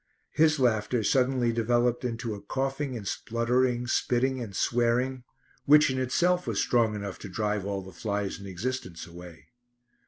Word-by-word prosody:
His 155 0 +3
laughter 115 -1 +1
suddenly 125 0 +2
developed 120 +1 +1
into 115 -2 -3
a 100 - -8
coughing 135 +3 -2
and 100 -3 -7
spluttering, 120 +1 0
spitting 125 +2 +1
and 105 -5 -7
swearing, 125 +2 +1 0.4
which 150 -1 +6
in 130 - -2
itself 175 +8 +1
was - - -1
strong 115 -3 +2
enough 100 -2 -5
to 100 - -8
drive 105 +1 -2
all 100 -1 -3
the 95 - -11
flies 100 -1 -3
in 100 - -9
existence 95 -3 -4
away. 85 -1 -12
120 Hz, 155 wpm, -28 LUFS, 105-130 Hz, 0.4 s, which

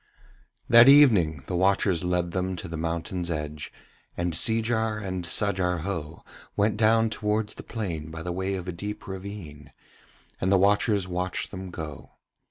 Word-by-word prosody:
That 120 +3 +8
evening 100 - +5
the 90 - -4
watchers 95 -1 +2
led 90 -1 0
them 95 +1 -2
to 90 - -7
the 85 - -6
mountain's 85 +2 -3
edge, 75 -2 -4 0.5
and 85 -1 -1
Seejar 110 +4 +1
and 95 -4 -4
Sajar 90 -1 0
Ho 80 -4 -5 0.3
went 105 +2 +2
down 110 +1 +3
towards 105 0 -1
the - - -9
plain 85 -9 -5
by 80 0 -7
the 90 - -3
way 95 +2 -2
of 90 -1 -6
a - - -2
deep 105 +5 -6
ravine, 95 -6 -8 0.7
and 95 - 0
the 100 - +5
watchers 100 0 +2
watched 90 0 -3
them 95 -1 -7
go. 80 -5 -8
95 Hz, 160 wpm, -26 LUFS, 85-105 Hz, 0.7 s, That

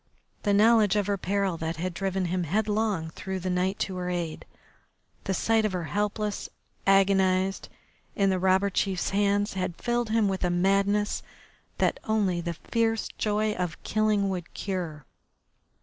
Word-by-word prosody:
The 205 - +1
knowledge 210 0 +5
of 205 -1 +2
her 205 0 0
peril, 195 -1 0
that 160 +1 -3
had 175 +2 -3
driven 190 0 -1
him 180 0 -1
headlong 205 -2 0
through 190 +3 -5
the 185 0 -2
night 185 +2 0
to 190 -2 -2
her 180 0 -3
aid, 170 -3 -3 0.8
the 190 - 0
sight 225 +2 +2
of 215 -3 0
her 180 -2 -2
helpless, 210 +3 -2 0.4
agonised, 195 -1 +3 0.5
in 195 -1 +3
the 185 - 0
robber 190 +2 +3
chief's 190 -1 0
hands, 205 +1 +1
had 185 -2 -2
filled 240 -1 0
him 220 -1 +3
with 190 -1 -2
a 180 - +2
madness 195 +3 +2 0.6
that - - +1
only 200 -6 +1
the 170 0 -3
fierce 225 +4 -1
joy 215 0 +1
of 180 -5 -3
killing 215 -2 +1
would 180 -3 -4
cure. 170 -7 -4
195 Hz, 160 wpm, -27 LUFS, 180-210 Hz, 0.8 s, knowledge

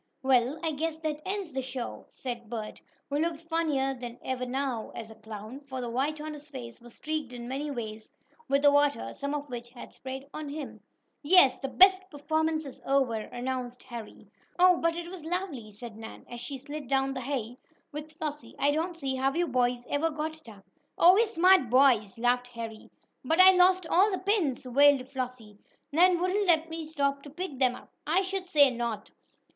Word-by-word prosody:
"Well, 260 +2 +3
I 325 - +1
guess 315 +2 -2
that 305 -1 -3
ends 385 -5 -3
the 265 - -1
show," 255 -1 -6
said 240 -3 -7
Bert, 220 -3 -6 0.3
who 285 +1 -1
looked 330 0 -1
funnier 310 -5 0
than 245 -2 -8
ever 255 -1 -2
now, 260 -3 -2
as 225 -1 -7
a - - -12
clown, 220 +3 -9
for 275 -2 -7
the 240 -2 -4
white 285 +5 -1
on 305 0 -5
his 295 0 -10
face 245 -5 -9
was 240 -1 -12
streaked 305 -4 -3
in 240 -1 -7
many 275 +4 -3
ways 220 -5 -6 0.4
with 275 +1 +2
the 285 - +7
water, 285 - +2
some 280 +1 -3
of 290 0 -4
which 240 -2 -6
had 240 0 -11
sprayed 265 +1 -7
on 305 -1 -5
him. 290 -1 -7 0.4
"Yes, 310 -3 +6
the 270 - -4 0.4
performance 315 +1 -1
is 275 - -10
over," 270 -3 +2
announced 245 +2 -4
Harry. 235 -4 -9 0.3
"Oh, 360 0 +6
but 335 0 +1
it 340 0 -5
was 355 -2 -9
lovely!" 325 - -4
said 220 +2 -10
Nan, 220 0 -10
as 240 - -8
she 275 +1 -4
slid 285 +1 -7
down 270 +1 +1
the 260 - -4
hay 250 -2 -4 0.3
with 300 +1 -7
Flossie. 300 -2 -5
"I 285 - +3
don't 330 +3 -2
see 270 -4 -2
how 265 +1 +2
you 345 0 +1
boys 245 -2 0
ever 305 +3 +1
got 310 +1 -4
it 315 -7 -15
up." 200 -3 -15 0.3
"Oh, 355 +2 +8
we're 445 +4 +4
smart 365 - +4
boys!" 245 -5 +4
laughed 245 +1 +1
Harry. 230 -2 -8 0.3
"But 320 +6 +1
I 375 0 +10
lost 370 0 +4
all 375 +5 +4
the 380 - -1
pins!" 370 - 0
wailed 275 +1 +4
Flossie. 250 -6 -6 0.3
"Nan 350 +3 +5
wouldn't 375 +3 +1
let 330 -1 +3
me 325 -1 -5
stop 280 -2 -1
to 290 - -11
pick 305 -3 -6
them 255 -2 +3
up!" - - -14 0.2
"I 350 +5 +3
should 380 -1 -3
say 290 -6 +5
not! 235 -3 -4
280 Hz, 200 wpm, -29 LUFS, 245-315 Hz, 0.4 s, I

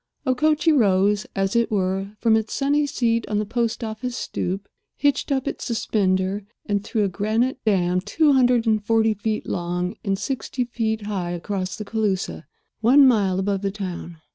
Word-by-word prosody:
Okochee 305 +5 +2
rose, 205 -5 +3
as 195 +2 0
it 235 0 +2
were, 195 0 -1
from 225 +1 +3
its 220 0 -1
sunny 290 +1 +1
seat 230 -4 0
on 210 - 0
the 210 - 0
post 235 +2 -1
office 235 +3 -4
stoop, 195 +3 -3 0.3
hitched 285 +1 +1
up 265 -2 0
its - - -4
suspender, 195 -3 0 0.2
and 205 -1 -1
threw 215 0 0
a - - +2
granite 220 +7 0
dam 180 -3 +2
two 290 - +2
hundred 250 -3 +3
and 215 -2 +2
forty 225 0 +3
feet 215 +1 -3
long 180 +1 -2
and 195 -1 0
sixty 260 +3 -3
feet 220 -3 -2
high 195 -4 -3
across 185 +2 -3
the 215 -3 -6
Cooloosa 200 -6 -2 0.3
one 265 +5 +6
mile 200 -7 +3
above 195 0 0
the 200 - 0
town. 185 -4 -6
215 Hz, 170 wpm, -23 LUFS, 195-240 Hz, 0.3 s, one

